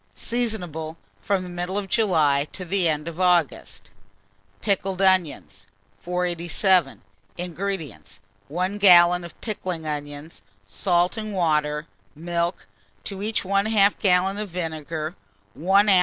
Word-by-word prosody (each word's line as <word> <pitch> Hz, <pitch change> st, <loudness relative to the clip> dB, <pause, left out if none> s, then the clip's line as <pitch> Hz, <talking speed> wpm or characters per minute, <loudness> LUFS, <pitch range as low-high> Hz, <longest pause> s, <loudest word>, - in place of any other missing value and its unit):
Seasonable 180 Hz, -10 st, -3 dB, 0.2 s
from 195 Hz, -2 st, 0 dB
the -, -, -7 dB
middle 175 Hz, +2 st, -4 dB
of 205 Hz, -1 st, -3 dB
July 155 Hz, -10 st, +2 dB
to 185 Hz, -, -6 dB
the 180 Hz, -1 st, +2 dB
end 150 Hz, 0 st, -2 dB
of 170 Hz, +1 st, -7 dB
August. 180 Hz, -2 st, 0 dB, 0.7 s
PICKLED 195 Hz, -2 st, -1 dB
ONIONS. 185 Hz, -5 st, +1 dB, 0.3 s
487. 175 Hz, -2 st, +1 dB, 0.3 s
INGREDIENTS. 175 Hz, -, -5 dB, 0.3 s
1 185 Hz, +7 st, -2 dB
gallon 175 Hz, -2 st, +7 dB
of 170 Hz, -, -11 dB
pickling 185 Hz, -7 st, -4 dB
onions, 145 Hz, +1 st, -6 dB, 0.2 s
salt 175 Hz, -, 0 dB
and 215 Hz, -2 st, -4 dB
water, 150 Hz, -3 st, +1 dB, 0.3 s
milk; 170 Hz, +2 st, -2 dB, 0.4 s
to 195 Hz, -1 st, -5 dB
each 215 Hz, +1 st, -1 dB
1/2 200 Hz, +1 st, +3 dB
gallon 190 Hz, +1 st, +2 dB
of 210 Hz, -1 st, -4 dB
vinegar, 160 Hz, -1 st, -4 dB, 0.4 s
1 195 Hz, +6 st, +3 dB
oz. 190 Hz, -3 st, +6 dB
180 Hz, 120 wpm, -24 LUFS, 160-195 Hz, 0.7 s, gallon